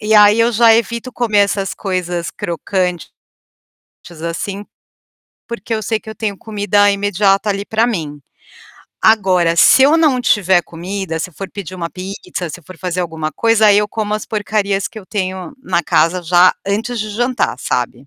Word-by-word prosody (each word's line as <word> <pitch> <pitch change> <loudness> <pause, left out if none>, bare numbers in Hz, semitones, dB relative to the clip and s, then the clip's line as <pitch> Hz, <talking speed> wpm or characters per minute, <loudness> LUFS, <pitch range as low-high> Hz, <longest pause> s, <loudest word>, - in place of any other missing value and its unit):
e 215 +1 +1
aí 210 +1 +6
eu 235 +1 +3
já 225 0 +5
evito 235 +2 -1
comer 225 -4 0
essas 200 -1 +1
coisas 180 -2 -3
crocantes, 180 0 -3 1.2
assim, 195 +4 -4 0.8
porque 235 -1 -6
eu 215 - -3
sei 220 +2 -1
que 220 - -10
eu - - -8
tenho 205 -3 -3
comida 205 -1 +1
imediata 200 0 +1
ali 200 0 -2
para 220 +2 +1
mim. 155 -10 -4 0.8
Agora 185 -6 +3
se 265 - +6
eu 295 +4 +5
não 285 -6 +3
tiver 190 -6 +3
comida, 175 0 -5
se 180 +3 -4
for 195 +4 -7
pedir 190 -3 -7
uma 170 -2 -5
pizza, 185 -2 -6
se 180 - -9
for 185 +4 -13
fazer 180 -1 -3
alguma 160 -3 -3
coisa, 225 +1 +3
aí 205 0 +6
eu 210 - +1
como 210 0 -2
as 215 - -4
porcarias 205 -2 -1
que 220 - -10
eu 195 - -12
tenho 190 +1 -4
na 170 - 0
casa 175 +4 +1
já 175 +2 +5
antes 225 +4 -2
de 215 0 -3
jantar, 245 - -1
sabe. 125 +2 -3
200 Hz, 175 wpm, -17 LUFS, 180-220 Hz, 1.2 s, aí